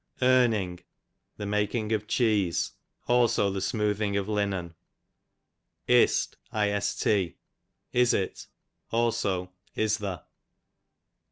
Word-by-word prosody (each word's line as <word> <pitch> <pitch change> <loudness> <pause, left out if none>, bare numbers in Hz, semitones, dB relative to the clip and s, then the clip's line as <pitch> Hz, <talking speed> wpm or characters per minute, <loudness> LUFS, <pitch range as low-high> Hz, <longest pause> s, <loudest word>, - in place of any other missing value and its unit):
Irning, 115 -8 +3 0.6
the 105 - -5
making 105 +2 -1
of 105 -1 -1
cheese; 105 -8 +1 0.4
also 120 -4 +3
the 95 0 -3
smoothing 105 -2 0
of 100 0 -2
linen. 100 -5 -1 1.1
1st, 100 -2 +1 0.6
is 125 -1 +4
it; 95 - -2 0.4
also 100 -6 0 0.2
is 110 -1 +1
the. 95 -5 -4
105 Hz, 85 wpm, -27 LUFS, 95-110 Hz, 1.1 s, is